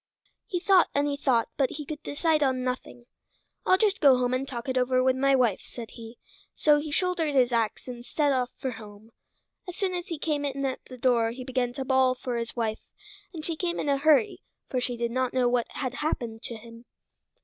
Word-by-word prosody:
He 355 - -2
thought 375 0 +4
and 285 0 +2
he 285 - -1
thought, 255 -5 +1
but 270 -2 +2
he 300 0 -6
could 305 +1 -6
decide 310 +1 0
on 260 -2 +1
nothing. 250 -1 -4 0.6
"I'll 370 - +6
just 415 -1 +1
go 275 -3 +7
home 250 0 0
and 260 +2 -1
talk 240 -2 -6
it 260 - -1
over 255 0 +2
with 260 0 +3
my 275 +1 +3
wife," 240 -6 +2
said 235 -2 -9
he; 230 0 -11 0.4
so 295 -1 +4
he 305 +1 -5
shouldered 330 -3 0
his 250 -2 +4
ax, 230 0 -1
and 245 -1 -7
set 290 +3 +1
off 250 -2 +1
for 260 - -3
home. 215 -1 -12 0.6
As 350 - -7
soon 380 -2 -1
as 350 -1 -4
he 330 - -4
came 295 -1 -1
in 275 -1 -2
at 260 -1 -3
the 255 - -11
door 235 -2 +2
he 250 +3 -7
began 250 -1 -1
to 265 +1 -4
bawl 260 -1 +3
for 245 -1 -4
his 230 0 -4
wife, 225 -2 -1 0.5
and 320 -4 -7
she 335 - -2
came 345 +1 -2
in 290 - -1
a 275 -1 +2
hurry, 285 -5 +3 0.3
for 255 - 0
she 245 -1 -2
did 235 0 -1
not 255 0 0
know 250 -1 +3
what 240 -1 +1
had 255 -3 -4
happened 235 -7 -3
to 235 - -5
him. 230 +1 -12
260 Hz, 225 wpm, -27 LUFS, 240-290 Hz, 0.6 s, go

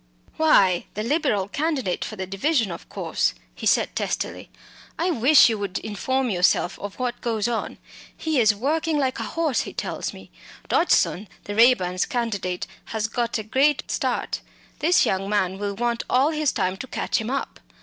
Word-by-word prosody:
"Why, 195 - +4
the 215 - -2
Liberal 240 - +1
candidate 280 - -1
for 215 - -6
the 190 -2 -4
division, 210 - 0
of 170 - -9
course," - - -1 0.2
he - - -4
said - - +2
testily. - - -3 0.5
"I 355 +2 +1
wish 290 +1 +6
you 225 -3 -1
would 200 -2 -3
inform 250 +5 -1
yourself 180 0 +2
of 205 -1 -7
what 250 -1 -3
goes 225 -2 -1
on. 235 -2 -3 0.4
He 315 -4 0
is 215 -3 +4
working 310 +7 0
like 265 -4 0
a - - -2
horse, 320 -6 +1
he - - -7
tells - - -3
me. - - -13 0.4
Dodgson, 210 - +2 0.2
the 205 - -5
Raeburns' 195 -6 +3
candidate, 200 -7 -2 0.2
has 220 -1 -2
got 235 0 -1
a 220 - -4
great 270 +6 +1
start; - - -1 0.4
this 340 +3 +4
young 195 +1 -1
man 190 -2 0
will 205 -1 -3
want 235 +2 -1
all 270 +5 +3
his 305 -3 +1
time 185 +1 -1
to 260 - -7
catch - - -1
him 220 - -4
up. 275 +1 -3
230 Hz, 175 wpm, -24 LUFS, 200-275 Hz, 0.5 s, wish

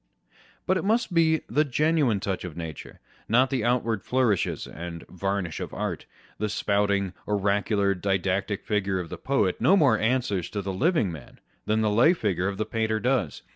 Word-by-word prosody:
But 185 - +2
it - - -2
must 220 0 +1
be 160 -2 +3
the 150 - +2
genuine 150 -5 +1
touch 95 -1 -3
of 90 -3 -7
nature, 80 -3 -8 0.3
not 125 +4 +4
the 130 -4 0
out 120 +1 +2
ward 110 -3 -2
flourishes 120 -7 0
and 85 0 -8
varnish 95 -2 -3
of - - -6
art. - - -4 0.3
The 105 +1 -1
spouting, 100 -2 0
oracular, 100 0 +1
didactic 95 +1 -1
figure 100 -3 0
of 85 -3 -5
the - - -7
poet 130 -9 0
no 195 - +5
more 130 - +4
answers 110 -6 0
to 100 -2 -4
the 95 0 -3
living 140 - +1
man, 75 -6 -11 0.3
than 110 +1 +2
the 105 -1 +2
lay 120 +11 +5
figure 100 - -1
of 100 -1 -3
the 110 - -1
painter 110 0 -1
does. 120 - -1
105 Hz, 180 wpm, -26 LUFS, 95-130 Hz, 0.3 s, no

